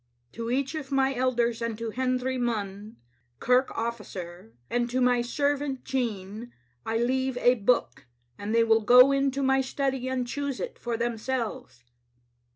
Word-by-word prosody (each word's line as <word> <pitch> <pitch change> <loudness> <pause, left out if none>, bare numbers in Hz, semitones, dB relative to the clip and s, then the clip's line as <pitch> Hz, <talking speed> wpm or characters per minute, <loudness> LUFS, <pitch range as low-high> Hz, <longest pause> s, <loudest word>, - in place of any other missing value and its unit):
" - - -46
To 230 0 -5
each 270 +3 0
of 295 -3 -6
my 270 0 +2
elders, 240 -2 0
and 230 -2 -2
to 230 0 -4
Hendry 255 +1 -1
Munn, 210 -3 -3 0.4
kirk 250 +2 +3
ofiicer, 190 - -6 0.2
and 240 0 -1
to 255 +2 -1
my 250 -1 +3
servant 280 +1 -1
Jean, 225 -2 -3 0.4
I 225 0 0
leave 260 +2 0
a 245 0 +5
book, 205 - 0 0.3
and 205 - -5
they 230 - +5
will 225 0 +4
go 270 +5 +6
to 275 +1 -2
my 265 0 +3
study 265 -1 -2
and 260 -1 -1
choose 280 +1 -3
it - - -5
for 235 -1 -3
themselves. 230 - -3
245 Hz, 160 wpm, -27 LUFS, 225-265 Hz, 0.4 s, go